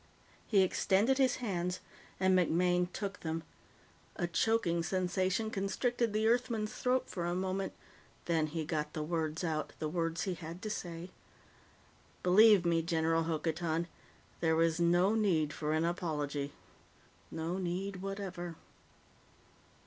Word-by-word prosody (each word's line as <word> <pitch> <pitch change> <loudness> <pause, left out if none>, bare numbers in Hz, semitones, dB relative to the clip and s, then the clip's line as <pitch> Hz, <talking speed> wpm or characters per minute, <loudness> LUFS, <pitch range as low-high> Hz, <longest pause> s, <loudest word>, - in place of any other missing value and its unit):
He 200 -4 +5
extended 205 +7 +2
his 260 -2 +4
hands 180 -6 -2 0.4
and 185 0 +4
MacMaine 180 0 +2
took 200 +1 -4
them. 160 0 -3 0.7
A 175 - -1
choking 175 -1 +1
sensation 185 +4 0
constricted 225 +4 0
the 215 +1 +1
Earthman's 230 -2 +1
throat 255 +1 0
for 175 - -4
a 175 - -1
moment, 190 +1 -2 0.5
then 160 -2 +1
he 160 +1 -3
got 150 -1 -2
the 155 - -2
words 160 0 -2
out 155 -3 -2
the 155 - -2
words 165 +1 -1
he 190 - -1
had 170 0 -7
to 215 - -2
say. 175 -2 -5 1.1
"Believe 200 0 +7
me, 165 -1 +3
General 165 -1 +1
Hokotan, 165 +1 -1 0.5
there 160 -1 +2
is 165 0 +1
no 175 +4 +4
need 170 -9 +2
for 150 -1 -2
an 160 +1 +2
apology. 150 -5 -2 0.8
No 165 +3 -3
need 185 +2 -3
whatever." 190 -3 -5
175 Hz, 135 wpm, -33 LUFS, 165-195 Hz, 1.1 s, Believe